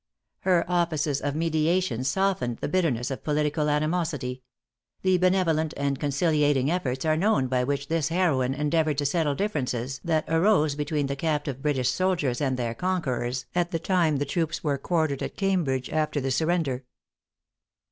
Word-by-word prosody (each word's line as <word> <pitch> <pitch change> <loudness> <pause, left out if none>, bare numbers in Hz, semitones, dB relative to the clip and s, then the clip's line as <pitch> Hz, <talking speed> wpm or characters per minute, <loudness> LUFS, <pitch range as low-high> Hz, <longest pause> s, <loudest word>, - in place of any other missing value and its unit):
Her 180 -2 +2
offices 160 -5 0
of 145 0 -2
mediation 160 -4 +1
softened 135 -5 0
the - - -3
bitterness 145 -8 0
of 135 - -5
political 150 0 0
animosity. 150 -4 -1 0.6
The 185 -1 +3
benevolent 170 -4 +2
and 140 -1 -1
conciliating 145 -1 +2
efforts 135 -6 -2
are 155 0 +3
known 165 -5 +2
by 125 0 0
which 140 +2 -2
this 165 -1 0
heroine 145 -7 +1
endeavored 150 0 +1
to 145 - 0
settle 150 -1 +1
differences 135 - -2
that 160 -2 +1
arose 165 -2 +3
between 150 0 -1
the 140 0 -2
captive 145 -3 -2
British 135 -4 +1
soldiers 170 -10 0
and 130 -3 0
their 120 -2 -2
conquerors, 130 -6 -2
at 175 -1 +1
the 170 - -1
time 170 -3 +1
the 145 - -1
troops 160 +2 -2
were 145 -3 0
quartered 155 -3 0
at - - -5
Cambridge 170 -10 0
after 155 -1 0
the 135 -1 -2
surrender. 155 -3 0
150 Hz, 155 wpm, -26 LUFS, 135-170 Hz, 0.6 s, The